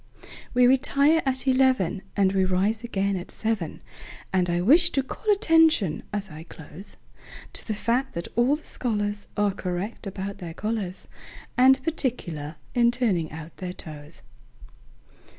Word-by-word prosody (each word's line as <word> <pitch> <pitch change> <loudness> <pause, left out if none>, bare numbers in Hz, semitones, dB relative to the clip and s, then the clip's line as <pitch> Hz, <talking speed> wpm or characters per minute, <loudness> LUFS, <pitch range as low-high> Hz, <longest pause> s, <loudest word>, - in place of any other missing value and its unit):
We 250 0 +6
retire 280 +4 +4
at 260 0 -1
eleven, 255 -8 +3 0.2
And 195 -1 +3
we 190 -1 +3
rise 195 +5 +1
again 200 -4 0
at 180 -1 -5
seven; 220 -8 -3 0.5
And 180 -2 +2
I 175 0 +1
wish 315 - +5
to 270 - +1
call 425 +10 -2
attention, 325 - +4
as 200 -3 -3
I 155 +1 -8
close, 165 +3 -9 0.6
To - - -5
the 215 - -1
fact 245 +5 0
that 170 - -4
all 240 +5 +4
the 310 - -11
scholarsAre 205 -3 -2
correct 185 +4 -4
about 195 +1 -5
their 170 -3 -7
collars, 210 -4 -3 0.5
And 265 +1 +5
particular 175 - -2 0.2
in 240 -1 +4
turning 215 -10 0
out 160 +1 -9
their 180 -1 -5
toes. 150 -2 -8
205 Hz, 145 wpm, -25 LUFS, 180-255 Hz, 0.6 s, We